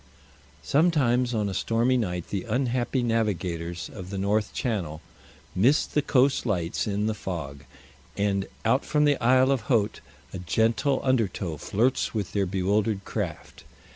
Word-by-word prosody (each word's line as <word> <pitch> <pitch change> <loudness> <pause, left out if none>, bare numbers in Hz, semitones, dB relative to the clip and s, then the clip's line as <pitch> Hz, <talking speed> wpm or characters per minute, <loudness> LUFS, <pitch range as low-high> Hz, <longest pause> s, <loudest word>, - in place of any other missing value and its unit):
Sometimes 135 -6 +2
on 105 -2 0
a 100 - -3
stormy 115 +5 +1
night 90 -8 -2
the 100 +2 -3
unhappy 125 +1 0
navigators 90 -7 -1
of 95 -3 -8
the 100 - -4
North 105 +2 0
Channel 95 - -3 0.5
miss 130 +11 +3
the 150 - 0
coast 135 0 +2
lights 90 -7 -1
in 105 0 -1
the 110 - 0
fog, 75 -9 -6 0.5
and 100 -1 0 0.2
out 125 +5 +3
from 150 0 +2
the 145 -2 +2
Isle 130 +2 +5
of 135 -3 +1
Haut 110 -5 +1 0.3
a 95 - -5
gentle 115 +9 +1
undertow 105 - 0
flirts 120 - 0
with 105 -4 -3
their 100 -2 +1
bewildered 100 +2 0
craft. - - -5
110 Hz, 145 wpm, -26 LUFS, 95-125 Hz, 0.5 s, Isle